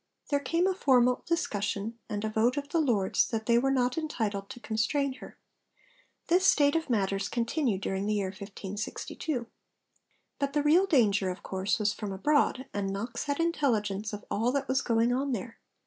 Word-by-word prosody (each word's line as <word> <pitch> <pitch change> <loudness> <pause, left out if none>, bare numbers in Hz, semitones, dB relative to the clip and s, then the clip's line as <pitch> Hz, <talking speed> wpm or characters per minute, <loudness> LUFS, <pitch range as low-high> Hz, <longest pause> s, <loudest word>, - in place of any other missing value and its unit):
there 285 - +2
came 330 +6 0
a 380 - +2
formal 250 -7 +3
discussion 215 - -2
and 210 0 -2
a - - -1
vote 225 +5 +1
of 285 0 -3
the 330 - +1
Lords 225 -11 +2
that 220 -1 -3
they 235 0 +4
were 270 +2 +1
not 255 +1 +1
entitled 215 -10 -3
to 260 - -8
constrain 260 +5 0
her. - - -11 0.9
This 360 +2 +3
state 285 -5 +4
of 325 -3 -1
matters 195 -3 0
continued 235 -3 0
during 195 +1 -2
the 215 - +1
year 195 -2 -1
1562. 205 +7 -5 0.9
But 280 -1 -1
the 295 -1 +1
real 340 +6 +5
danger, 210 - +3
of 180 - -6
course, 190 +1 -1
was 210 -1 +1
from 205 -2 -5
abroad, 265 +5 +1
and 195 -1 -2
Knox 230 +5 -4
had 285 +1 -2
intelligence 220 - 0
of 210 -1 -7
all 230 +4 +1
that 280 -1 -1
was 265 +1 +1
going 230 +1 +2
on 270 +1 0
there. 225 +1 -5
235 Hz, 180 wpm, -29 LUFS, 205-285 Hz, 0.9 s, real